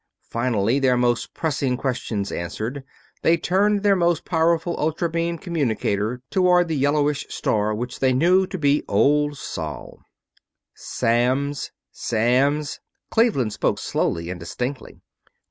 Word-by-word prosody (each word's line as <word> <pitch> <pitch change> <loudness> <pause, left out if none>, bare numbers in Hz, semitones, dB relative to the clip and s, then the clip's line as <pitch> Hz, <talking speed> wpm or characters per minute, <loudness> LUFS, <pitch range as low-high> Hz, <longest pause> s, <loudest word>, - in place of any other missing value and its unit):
Finally, 115 0 +1
their 130 -2 +3
most 120 -1 0
pressing 135 -5 -1
questions 120 -6 -3
answered, 110 - -4 0.4
they 165 +1 +4
turned 200 +4 +1
their 200 -1 +4
most 170 -3 +1
powerful 170 0 +1
ultra 160 +3 0
beam 170 +1 -2
communicator 125 - -1
toward 180 -2 +4
the 160 - -1
yellowish 145 +1 +1
star 105 0 0
which 120 +3 -5
they 130 -1 +3
knew 180 +8 +3
to 190 - -5
be 145 -2 +2
Old 145 0 +2
Sol. 80 - -6 0.7
"Samms... 130 +5 0 0.2
Samms." 135 +6 +1 0.3
Cleveland 205 - +2
spoke - - 0
slowly 85 +1 -2
and 90 - -6
distinctly. 125 +10 -5
140 Hz, 125 wpm, -23 LUFS, 120-165 Hz, 0.7 s, they